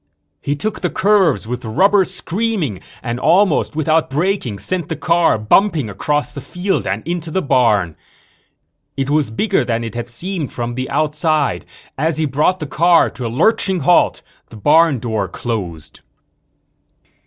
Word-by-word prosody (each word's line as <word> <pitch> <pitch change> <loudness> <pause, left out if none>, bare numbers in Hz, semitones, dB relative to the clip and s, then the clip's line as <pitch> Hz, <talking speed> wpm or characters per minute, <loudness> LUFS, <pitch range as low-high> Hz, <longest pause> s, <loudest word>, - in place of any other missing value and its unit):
He 145 - -1
took 215 +9 -3
the 180 - 0
curves 190 - +2
with 125 +2 -5
rubber 190 - +3
screaming 185 - -2 0.2
and 120 0 -3
almost 180 -1 +2
without 160 +1 +1
braking 150 - -1
sent 175 - -3
the - - -2
car 170 -6 +2
bumping 140 - +2
across 145 +8 -1
the 140 - -7
field 180 +7 -2
and 100 +8 -3
into 170 -1 -3
the 190 +4 -1
barn. 105 - +2 1.0
It 135 +1 -1
was 150 -5 +1
bigger 170 - 0
than 115 -1 -2
it 115 -2 -6
had 120 0 -5
seemed 165 +5 -4
from 120 0 -4
the 130 +1 -4
outside. 150 - 0 0.3
As 160 +2 0
he 160 - +1
brought 150 +7 +1
the 155 - -4
car 170 +4 +3
to 125 -2 -5
a - - -3
lurching 190 - +1
halt 175 +6 +3 0.3
the 115 - -12
barn 150 +5 +4
door 110 -4 -2
closed. 85 -12 -5
150 Hz, 155 wpm, -18 LUFS, 120-175 Hz, 1.0 s, barn